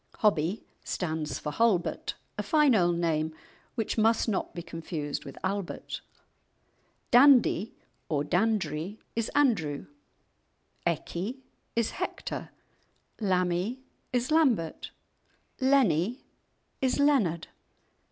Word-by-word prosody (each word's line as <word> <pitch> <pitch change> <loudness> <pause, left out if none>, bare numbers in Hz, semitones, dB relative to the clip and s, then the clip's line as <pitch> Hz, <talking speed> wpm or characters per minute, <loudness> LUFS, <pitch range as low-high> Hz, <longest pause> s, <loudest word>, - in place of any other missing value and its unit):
"Hobbie" 195 -2 +1 0.2
stands 155 -4 -2
for 150 - -4
"Halbert," 215 -3 +1 0.2
a - - -2
fine 300 -4 +4
old 175 -5 +3
name 160 -2 0 0.4
which 225 0 -1
must 225 +2 +3
not 210 -4 -1
be 170 - -5
confused 160 -3 -5
with 135 - -9
"Albert." 195 -1 -3 1.1
"Dandie" 245 -5 +6 0.3
or 145 -3 +1
"Dandrie" 180 -1 0 0.2
is 230 0 -1
"Andrew," 200 - +2 1.0
"Eckie" 185 - -3 0.3
is 230 -1 +1
"Hector," - - -4 0.7
"Lammie" 185 +4 0 0.3
is 250 +2 0
"Lambert," 250 - +2 0.7
"Lennie" 250 - +3 0.6
is 260 -1 +2
"Leonard." 260 - +2
195 Hz, 95 wpm, -29 LUFS, 165-240 Hz, 1.1 s, Dandie